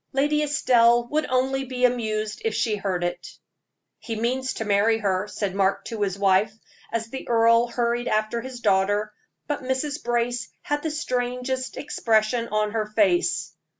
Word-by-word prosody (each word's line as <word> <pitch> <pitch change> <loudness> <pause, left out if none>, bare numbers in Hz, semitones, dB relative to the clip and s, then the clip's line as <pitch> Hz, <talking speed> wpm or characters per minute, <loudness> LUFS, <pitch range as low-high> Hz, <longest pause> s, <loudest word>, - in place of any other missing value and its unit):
Lady 295 +3 +2
Estelle 240 -5 +3
would 305 +1 0
only 265 +1 +1
be 255 -1 0
amused 215 -3 -1
if 225 -1 -1
she 230 -2 +1
heard 190 -3 -2
it." 175 0 -4 0.6
"He 225 - -5
means 255 +4 -1
to 225 - -4
marry 210 +2 +3
her," 200 -2 -1
said 205 -2 -3
Mark 195 0 +1
to 225 -2 -5
his 195 -1 0
wife, 200 +2 +3 0.4
as 225 0 -3
the 265 - -7
earl 230 0 +4
hurried 240 0 -1
after 215 +2 0
his 255 -1 -8
daughter; 205 +1 +1 0.3
but 295 - -3
Mrs. 265 +3 -2
Brace 240 0 -1
had 290 -4 -1
the 315 - -2
strangest 255 -2 -2
expression 230 -2 +1
on 215 -1 0
her 220 -1 -1
face. 315 +11 +1
235 Hz, 160 wpm, -24 LUFS, 215-255 Hz, 0.6 s, earl